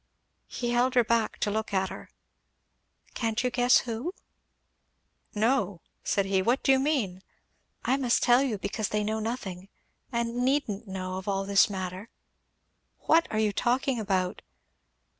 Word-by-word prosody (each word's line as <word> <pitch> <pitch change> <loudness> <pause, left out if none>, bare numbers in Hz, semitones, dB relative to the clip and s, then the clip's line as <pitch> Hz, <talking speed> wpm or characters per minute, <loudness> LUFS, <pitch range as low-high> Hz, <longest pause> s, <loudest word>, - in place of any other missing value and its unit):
He 240 -1 -3
held 250 +2 +2
her 245 - +6
back 230 -1 0
to 205 - +1
look 215 -1 -2
at 190 0 +1
her. - - -9 1.0
"Can't 225 0 -1
you 250 - 0
guess 245 0 +4
who?" 250 - -4 1.2
"No!" 215 -4 +1 0.2
said 200 - +1
he. 195 -1 +1
"What 240 +7 +1
do 270 - +4
you 265 - +5
mean?" 255 -11 0 0.6
"I 265 - +2
must 250 -3 +1
tell 245 +1 +5
you, 255 -6 0
because 200 +2 -3
they 210 0 0
know 220 +1 -1
nothing, 200 -5 -5 0.4
and 235 0 -1
needn't 245 -6 0
know, 185 -1 -4
of 190 - -11
all 195 -1 0
this 200 +1 +4
matter." 190 +2 -5 0.9
"What 330 +1 +4
are 215 - -2
you 215 -1 +2
talking 250 +3 +1
about?" 190 -3 -1
220 Hz, 155 wpm, -28 LUFS, 195-245 Hz, 1.2 s, her